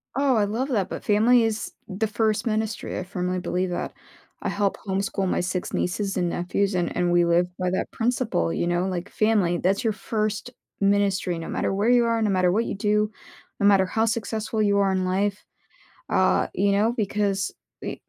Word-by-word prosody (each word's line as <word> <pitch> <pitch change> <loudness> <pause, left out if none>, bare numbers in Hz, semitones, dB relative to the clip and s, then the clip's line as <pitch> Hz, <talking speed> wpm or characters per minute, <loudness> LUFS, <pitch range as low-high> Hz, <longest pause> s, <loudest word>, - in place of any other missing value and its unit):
Oh, 275 -2 +3
I 205 - +3
love 235 +7 -2
that, 200 -7 0
but - - -6
family 225 +3 +4
is 220 -1 -2 0.2
the 205 +3 -1
1st 220 0 0
ministry, 215 -1 -2
I 180 - -3
firmly 180 0 -2
believe 180 +1 -1
that. 175 - -3 0.5
I - - -2
help 200 -1 0
homeschool 195 0 -1
my - - 0
6 180 0 -3
nieces 195 +2 -1
and 175 -2 0
nephews 190 +3 -1
and 175 -1 -1
and 175 -1 +1
we 175 0 +4
live 170 +1 +3
by 180 -1 -1
that 185 - -1
principle, 225 - 0
you 175 - -1
know, 175 +1 +1
like 180 +1 -4
family, 205 -6 +2
that's 195 +7 +1
your 225 -2 +1
1st 215 +2 -2 0.3
ministry 195 -3 +1
no 165 - -6
matter - - -1
where 205 +4 +1
you 245 -1 +5
are, 230 -1 +1
no 215 - +2
matter 185 -2 +3
what 225 +4 +1
you - - -3
do, 210 +1 +1 0.5
no 200 - +2
matter 195 -2 +5
how 225 +3 +1
successful 220 -1 -2
you 200 -1 +3
are 200 -1 +3
in 185 -1 0
life, 195 +2 0 0.7
uh, - - +3
you 200 0 +2
know, 215 +4 +2
because 200 -2 0 0.3
eh - - -4
200 Hz, 200 wpm, -24 LUFS, 185-220 Hz, 0.7 s, you